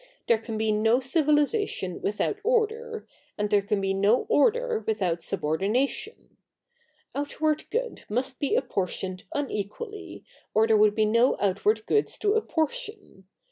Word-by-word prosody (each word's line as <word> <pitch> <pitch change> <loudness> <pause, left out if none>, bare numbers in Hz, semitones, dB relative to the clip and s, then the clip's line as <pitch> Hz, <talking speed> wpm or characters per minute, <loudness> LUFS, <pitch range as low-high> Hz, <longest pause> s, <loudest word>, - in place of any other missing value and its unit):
There 230 -2 +3
can 225 0 -5
be 220 0 +1
no 225 +3 +3
civilisation 295 - +1
with 210 - -2
out 415 - 0
order, 455 0 0 0.3
and 210 0 -1
there 205 - +4
can 200 +1 -1
be 195 0 0
no 200 +5 +3
order 470 - +2
without 190 -6 0
subordina 195 - 0
tion. 440 - -7 0.8
Outward 305 +2 -1
good 485 +1 -3
must 255 +4 -2
be 285 - 0
apportioned 190 -4 -2
unequally, 290 - -5 0.3
or 220 +1 +5
there 225 -1 +3
would 210 0 +4
be 215 - +3
no 230 +4 +3
outward 205 +2 +1
goods 425 - +1
to 410 -1 +1
apportion. 420 - -3
245 Hz, 140 wpm, -26 LUFS, -, 0.8 s, or